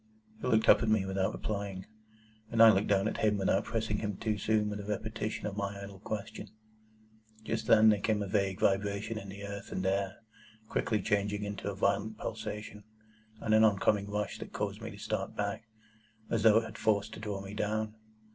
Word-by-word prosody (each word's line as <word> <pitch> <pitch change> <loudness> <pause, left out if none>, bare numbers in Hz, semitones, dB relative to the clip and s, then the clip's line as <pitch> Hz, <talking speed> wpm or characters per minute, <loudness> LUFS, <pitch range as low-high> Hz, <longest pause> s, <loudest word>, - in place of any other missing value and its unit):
He - - -2
looked 110 -3 +3
up - - +7
at 115 - +1
me 110 -3 +3
without 95 0 0
replying, 100 -3 -4 0.6
and 115 - -2
I 115 - +10
looked 100 0 +1
down 100 0 +3
at - - -2
him 105 -1 +2
without 95 0 +1
pressing 110 -2 -1
him 105 -3 -3
too 110 -1 -1
soon 110 0 +2
with 105 0 -4
a - - -5
repetition 110 +1 -3
of 100 - -3
my 100 -1 -3
idle 100 -1 -9
question. 105 +1 -5 1.0
Just - - -3
then 110 0 +7
there 105 -1 +4
came 105 -1 +1
a - - -4
vague 100 -1 0
vibration 100 +2 0
in 100 - -9
the 100 +1 -8
earth 100 0 -7
and 95 - -2
air, 95 0 0 0.5
quickly 105 -3 0
changing 105 0 0
into 100 0 -4
a 100 - -4
violent 100 +2 0
pulsation, 105 -1 -6 0.6
and 110 - +1
an 110 0 +6
oncoming 100 -1 +3
rush 105 0 -2
that - - -8
caused - - -3
me - - -5
to - - -10
start - - -3
back, 100 +2 -3 0.7
as 115 - +1
though 110 -1 +6
it 115 - +2
had - - -9
force 105 -2 +2
to - - -9
draw 105 -3 -4
me 95 +1 -8
down. 110 +1 -1
105 Hz, 205 wpm, -31 LUFS, 100-110 Hz, 1.0 s, I